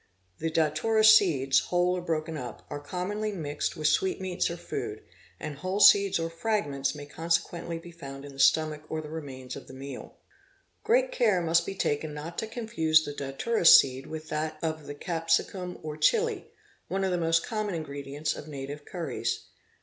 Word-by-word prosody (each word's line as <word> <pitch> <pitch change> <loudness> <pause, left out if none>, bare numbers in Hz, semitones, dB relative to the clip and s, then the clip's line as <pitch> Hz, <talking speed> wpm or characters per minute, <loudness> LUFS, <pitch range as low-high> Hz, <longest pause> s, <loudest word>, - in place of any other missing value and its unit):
The 165 - -1
datura 160 +8 +2
seeds—whole 180 - +5
or 180 - -3
broken 160 -1 -2
up—are. 145 +1 -7
commonly 190 +8 -3
mixed 150 -6 -3
with 155 - -5
sweetmeats 190 - +1
or 170 - -5
food, - - -5 0.4
and 150 -2 -6
whole 185 +5 -2
seeds 200 -1 +7
or 165 0 -1
fragments 165 -6 -1
may 145 -1 -8
consequently 170 +2 -2
be 170 +1 -11
found 140 -4 -9
in 140 - -10
the 135 - -13
stomach 155 +2 +3
or 160 - -2
the 155 -1 -8
remains 135 -5 -7
of 140 - -10
the 130 - -11
meal. 135 +1 -8 0.7
Great - - +3
care 220 - +3
must 170 0 +2
be 195 - -4
taken 150 -4 -1
not 155 +3 -6
to 220 - -3
confuse 160 -10 +2
the 145 - -5
datwra 145 +9 0
seed 130 -3 +7
with 155 0 -7
that 155 0 -2
of 155 -2 -3
the 145 - -6
Capsicum 170 +3 -1
or 155 -1 -5
Chili, 460 - +2 0.4
one 195 0 -1
of 190 - +1
the 180 - +1
most 165 0 +2
common 215 -4 -2
ingredients 145 -1 -4
of 150 - -9
native 145 0 -7
curries. 125 -10 -3
160 Hz, 175 wpm, -28 LUFS, 145-185 Hz, 0.7 s, seeds